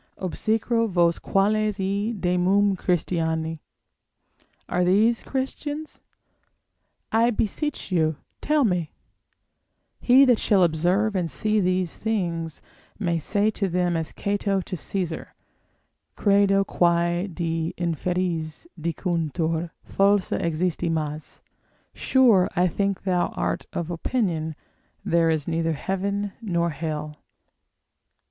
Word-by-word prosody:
Obsecro 225 Hz, +5 st, 0 dB
vos 170 Hz, -2 st, +2 dB
quales 210 Hz, +1 st, +1 dB
hi 200 Hz, +3 st, -1 dB
demum 190 Hz, +3 st, +2 dB
Christiani! 160 Hz, -3 st, -1 dB, 1.1 s
Are 180 Hz, -, +1 dB
these 215 Hz, +6 st, +3 dB
Christians? 290 Hz, +3 st, -4 dB, 1.1 s
I 230 Hz, +2 st, +4 dB
beseech 245 Hz, +3 st, -2 dB
you 160 Hz, -3 st, +2 dB, 0.3 s
tell 300 Hz, -1 st, +2 dB
me: 180 Hz, -8 st, 0 dB, 1.1 s
he 260 Hz, +3 st, +6 dB
that 245 Hz, -4 st, +4 dB
shall 195 Hz, -3 st, +3 dB
observe 175 Hz, +6 st, +1 dB
and 175 Hz, -3 st, 0 dB
see 215 Hz, +4 st, 0 dB
these 185 Hz, -2 st, 0 dB
things, 170 Hz, -7 st, -2 dB, 0.3 s
may 170 Hz, -5 st, 0 dB
say 205 Hz, +6 st, +1 dB
to 200 Hz, -2 st, -1 dB
them 175 Hz, 0 st, +1 dB
as 160 Hz, -1 st, -2 dB
Cato 200 Hz, -1 st, -1 dB
to 185 Hz, -, -6 dB
Caesar, 175 Hz, 0 st, -4 dB, 0.8 s
credo 200 Hz, -1 st, +3 dB
quae 175 Hz, 0 st, +1 dB
de 165 Hz, -2 st, -2 dB
inferis 170 Hz, -, -2 dB
dicuntur 165 Hz, 0 st, -1 dB, 0.2 s
falsa 200 Hz, 0 st, +2 dB
existimas, 160 Hz, -2 st, -2 dB, 0.5 s
sure 235 Hz, -9 st, +4 dB
I 180 Hz, 0 st, +3 dB
think 195 Hz, +2 st, -1 dB
thou 180 Hz, -2 st, +1 dB
art -, -, -2 dB
of 170 Hz, 0 st, -3 dB
opinion 165 Hz, -4 st, -1 dB, 0.5 s
there 165 Hz, -1 st, +3 dB
is 155 Hz, -3 st, 0 dB
neither 165 Hz, -1 st, 0 dB
heaven 200 Hz, +5 st, -2 dB
nor 170 Hz, -5 st, 0 dB
hell. 150 Hz, -1 st, -5 dB
180 Hz, 105 wpm, -24 LUFS, 165-205 Hz, 1.1 s, he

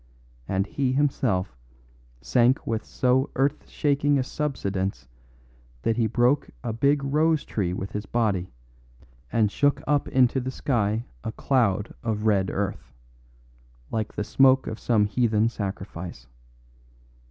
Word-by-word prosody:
And 95 Hz, 0 st, 0 dB
he 130 Hz, +4 st, -1 dB
himself 125 Hz, -, 0 dB, 0.7 s
sank 120 Hz, -, +3 dB
with 110 Hz, -1 st, -2 dB
so 130 Hz, +2 st, +1 dB
earth 140 Hz, +2 st, 0 dB
shaking 145 Hz, 0 st, +1 dB
a 130 Hz, -, +1 dB
subsidence 100 Hz, -, -3 dB, 0.8 s
that 115 Hz, -, +1 dB
he 115 Hz, -2 st, +2 dB
broke 120 Hz, +5 st, +2 dB
a 115 Hz, -, -2 dB
big 140 Hz, +5 st, +2 dB
rose 155 Hz, +2 st, +2 dB
tree 95 Hz, -5 st, -1 dB
with 95 Hz, +2 st, -4 dB
his 105 Hz, -1 st, -5 dB
body 100 Hz, -, 0 dB, 0.8 s
and 110 Hz, -3 st, +2 dB
shook 145 Hz, +5 st, +2 dB
up 145 Hz, -1 st, +1 dB
into 130 Hz, 0 st, +3 dB
the 130 Hz, 0 st, -3 dB
sky 115 Hz, -4 st, -1 dB, 0.2 s
a -, -, -3 dB
cloud 110 Hz, -7 st, +1 dB
of 110 Hz, -2 st, -2 dB
red 100 Hz, -3 st, +2 dB
earth 100 Hz, -10 st, -3 dB, 1.0 s
like 110 Hz, -1 st, -3 dB
the 105 Hz, -, -1 dB
smoke 135 Hz, +4 st, +4 dB
of 110 Hz, -, -5 dB
some 110 Hz, -4 st, +2 dB
heathen 110 Hz, 0 st, +2 dB
sacrifice. 95 Hz, -, -6 dB
115 Hz, 130 wpm, -25 LUFS, 100-135 Hz, 1.0 s, smoke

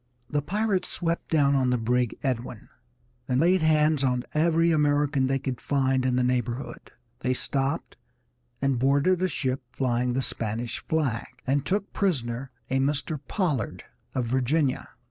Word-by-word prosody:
The 145 Hz, -, +1 dB
pirates 200 Hz, +4 st, 0 dB
swept 170 Hz, -1 st, -2 dB
down 145 Hz, -3 st, +3 dB
on 130 Hz, -2 st, +2 dB
the 125 Hz, -, +2 dB
brig 120 Hz, +1 st, 0 dB
Edwin, 125 Hz, -4 st, -3 dB, 0.6 s
and 125 Hz, 0 st, +1 dB
laid 180 Hz, +4 st, +4 dB
hands 155 Hz, -2 st, +3 dB
on 125 Hz, -2 st, +1 dB
every 165 Hz, +2 st, +3 dB
American 145 Hz, -3 st, +2 dB
they 135 Hz, +1 st, +1 dB
could 130 Hz, -2 st, -4 dB
find 130 Hz, -2 st, +1 dB
in 125 Hz, -, +1 dB
the 125 Hz, -, +2 dB
neighborhood. 125 Hz, +1 st, -2 dB, 0.3 s
They 130 Hz, 0 st, 0 dB
stopped 135 Hz, +1 st, -2 dB, 0.7 s
and 135 Hz, -3 st, +2 dB
boarded 140 Hz, +8 st, +3 dB
a 185 Hz, -, +3 dB
ship 130 Hz, -4 st, -2 dB
flying 125 Hz, -1 st, 0 dB
the 130 Hz, +1 st, 0 dB
Spanish 115 Hz, +1 st, -2 dB
flag, 140 Hz, -8 st, -1 dB, 0.2 s
and 135 Hz, +1 st, +1 dB
took 200 Hz, +1 st, -1 dB
prisoner 130 Hz, -, -1 dB, 0.2 s
a 135 Hz, 0 st, +1 dB
Mr. 145 Hz, +2 st, 0 dB
Pollard, 155 Hz, -, -1 dB, 0.3 s
of 130 Hz, -2 st, 0 dB
Virginia. 130 Hz, +3 st, 0 dB
135 Hz, 150 wpm, -26 LUFS, 125-155 Hz, 0.7 s, laid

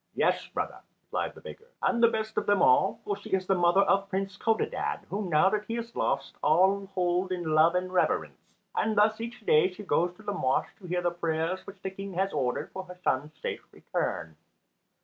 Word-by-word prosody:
"Yes, -, -, +1 dB
brother," -, -, -4 dB, 0.2 s
replied -, -, -3 dB
the -, -, -13 dB
beggar, 455 Hz, -, -11 dB, 0.2 s
"and 235 Hz, -1 st, +2 dB
the 235 Hz, -, +8 dB
best 220 Hz, -1 st, -2 dB
of -, -, -1 dB
them 205 Hz, -1 st, +4 dB
all; 160 Hz, +9 st, +4 dB
for 205 Hz, -, -2 dB
she 200 Hz, -, -11 dB
is 190 Hz, -1 st, +1 dB
the 195 Hz, -, +2 dB
mother 175 Hz, +1 st, +4 dB
of 195 Hz, 0 st, +2 dB
Prince 195 Hz, 0 st, -2 dB
Codadad, 225 Hz, +2 st, -1 dB
whom, 200 Hz, -1 st, -2 dB
now 155 Hz, +3 st, +5 dB
that 210 Hz, 0 st, -1 dB
he 230 Hz, -, -2 dB
is 235 Hz, 0 st, -6 dB
lost, -, -, -1 dB
all 190 Hz, +6 st, +3 dB
hold 180 Hz, +1 st, +1 dB
in 180 Hz, -1 st, -2 dB
love 160 Hz, +3 st, +5 dB
and 185 Hz, 0 st, -1 dB
reverence. 180 Hz, -, 0 dB, 0.3 s
And 215 Hz, 0 st, 0 dB
thus 215 Hz, +2 st, +3 dB
each 235 Hz, +1 st, -6 dB
day 155 Hz, +5 st, +4 dB
she 205 Hz, +3 st, -10 dB
goes 175 Hz, -2 st, +1 dB
to 215 Hz, -, -16 dB
the 205 Hz, -1 st, -2 dB
mosque 130 Hz, -9 st, 0 dB
to 185 Hz, -, -11 dB
hear 175 Hz, 0 st, -1 dB
the 175 Hz, -, +2 dB
prayers 170 Hz, +2 st, -2 dB
which 195 Hz, -1 st, -11 dB
the 190 Hz, -, -3 dB
King 195 Hz, 0 st, -7 dB
has 195 Hz, +2 st, 0 dB
ordered 130 Hz, -4 st, -1 dB
for 190 Hz, -, -5 dB
her 180 Hz, 0 st, -11 dB
son's 145 Hz, +4 st, -1 dB
safe -, -, -3 dB
return." 80 Hz, -2 st, -3 dB
190 Hz, 215 wpm, -28 LUFS, 175-205 Hz, 0.3 s, the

